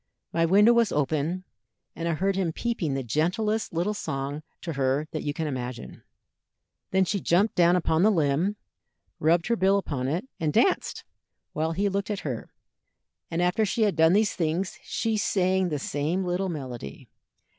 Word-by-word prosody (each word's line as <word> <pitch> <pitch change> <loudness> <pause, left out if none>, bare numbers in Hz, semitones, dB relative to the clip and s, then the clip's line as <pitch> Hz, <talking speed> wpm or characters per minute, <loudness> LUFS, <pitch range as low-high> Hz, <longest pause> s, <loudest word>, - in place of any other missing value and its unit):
My 165 0 +2
window 205 +6 +6
was 235 -2 +3
open, 155 +5 0 0.5
and 165 - -3
I 165 - +1
heard 195 +4 0
him 185 -4 0
peeping 175 - -2
the 135 - -2
gentlest 185 - 0
little 175 +5 0
song 140 -6 -4 0.2
to 165 - -3
her 135 +2 0
that 155 - -3
you 145 - -2
can 160 +2 -3
imagine. 125 -4 -5 0.9
Then 190 0 +3
she 200 +3 -1
jumped 190 +5 +2
down 175 0 +4
upon 160 -2 +1
the 210 - +6
limb, 165 +2 +1 0.6
rubbed 165 +2 +3
her 235 - +1
bill 195 -1 +3
upon 140 -9 -2
it, 170 - -2
and 155 -2 0
danced, - - +1 0.5
while 160 +1 -1
he 200 +4 +1
looked 200 +1 -2
at 205 -2 -2
her, 125 -6 -5 0.8
and 170 +1 0
after 180 +5 +2
she 220 +2 +1
had 205 -2 +2
done 160 +1 +5
these 210 +1 +3
things 170 +3 -2
she 225 -1 -1
sang 190 -2 +1
the 150 - -1
same 150 +6 -1
little 180 +2 -1
melody. 125 - -7
170 Hz, 175 wpm, -26 LUFS, 150-195 Hz, 0.9 s, window